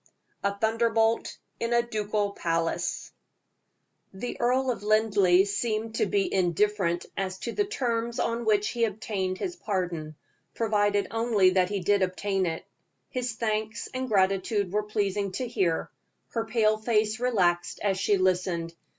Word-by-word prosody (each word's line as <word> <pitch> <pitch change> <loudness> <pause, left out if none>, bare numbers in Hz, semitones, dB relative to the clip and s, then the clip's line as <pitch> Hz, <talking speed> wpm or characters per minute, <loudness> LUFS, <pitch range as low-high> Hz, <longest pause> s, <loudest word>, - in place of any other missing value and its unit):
A 200 0 0
THUNDERBOLT 225 +1 +1 0.2
IN 230 +1 -1
A 235 0 +4
DUCAL 210 -2 -1
PALACE. 165 -3 -2 1.0
The 195 +6 -5
Earl 255 +2 +2
of 235 - -5
Linleigh 205 -4 +4
seemed 220 +2 -2
to - - +1
be 395 -3 0
indifferent 185 -1 +1
as 190 -1 -3
to 235 - -3
the 410 - 0
terms 235 - -2
on 235 +1 0
which 210 -2 +2
he 235 -1 +1
obtained 195 -3 -3
his 355 - -4
pardon, 175 - -3 0.4
provided 205 -3 +2
only 225 -5 +3
that 185 -1 +2
he 200 -2 -2
did 200 +2 +2
obtain 190 0 0
it. 160 -1 -4 0.4
His 250 -3 -2
thanks 220 0 -2
and 255 0 -3
gratitude 195 0 +1
were 210 - +2
pleasing 205 -2 -1
to 255 +3 -2
hear. 185 -8 0 0.4
Her 230 -1 -2
pale 220 -2 +2
face 215 0 +1
relaxed 180 -8 +1
as 195 -2 +1
she 205 +1 +2
listened. 180 -2 0
210 Hz, 145 wpm, -27 LUFS, 190-230 Hz, 1.0 s, A